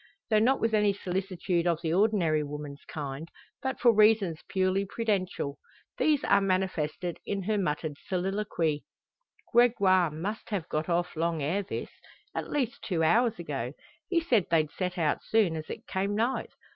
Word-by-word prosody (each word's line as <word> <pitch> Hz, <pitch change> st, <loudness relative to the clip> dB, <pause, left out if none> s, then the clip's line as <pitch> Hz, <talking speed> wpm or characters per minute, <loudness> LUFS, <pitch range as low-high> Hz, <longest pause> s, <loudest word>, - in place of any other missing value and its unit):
Though 215 Hz, -, +5 dB
not 255 Hz, +5 st, +3 dB
with 225 Hz, 0 st, 0 dB
any 210 Hz, -1 st, +4 dB
solicitude 185 Hz, -2 st, -1 dB
of 170 Hz, 0 st, 0 dB
the 160 Hz, -1 st, 0 dB
ordinary 180 Hz, -6 st, +3 dB
woman's 145 Hz, -1 st, -6 dB
kind, 145 Hz, +1 st, -5 dB, 0.3 s
but 265 Hz, 0 st, -2 dB
for 240 Hz, -1 st, +6 dB
reasons 210 Hz, -6 st, +4 dB
purely 190 Hz, +1 st, +1 dB
prudential. 195 Hz, -9 st, -2 dB, 0.4 s
These 300 Hz, -3 st, +3 dB
are 200 Hz, 0 st, +4 dB
manifested 185 Hz, -3 st, -1 dB
in 200 Hz, -1 st, -3 dB
her 210 Hz, +2 st, 0 dB
muttered 150 Hz, -4 st, -2 dB
soliloquy: 180 Hz, -5 st, -1 dB, 0.7 s
"Gregoire 200 Hz, -7 st, +5 dB
must 185 Hz, +9 st, -5 dB
have 195 Hz, -7 st, -2 dB
got 155 Hz, +3 st, -2 dB
off 175 Hz, +1 st, 0 dB
long 165 Hz, -1 st, 0 dB
ere 175 Hz, +8 st, 0 dB
this 200 Hz, -, -5 dB, 0.4 s
at -, -, -4 dB
least 270 Hz, -2 st, -1 dB
two 170 Hz, -5 st, -1 dB
hours 230 Hz, +7 st, +3 dB
ago. 140 Hz, -7 st, -4 dB, 0.4 s
He 345 Hz, -, +3 dB
said 240 Hz, -, +2 dB
they'd 160 Hz, -2 st, +2 dB
set 180 Hz, -1 st, -3 dB
out 155 Hz, -3 st, +1 dB
soon 210 Hz, -7 st, +2 dB
as 155 Hz, -1 st, -6 dB
it -, -, -7 dB
came 195 Hz, +2 st, -1 dB
night. 235 Hz, +5 st, 0 dB
185 Hz, 160 wpm, -29 LUFS, 160-210 Hz, 0.7 s, for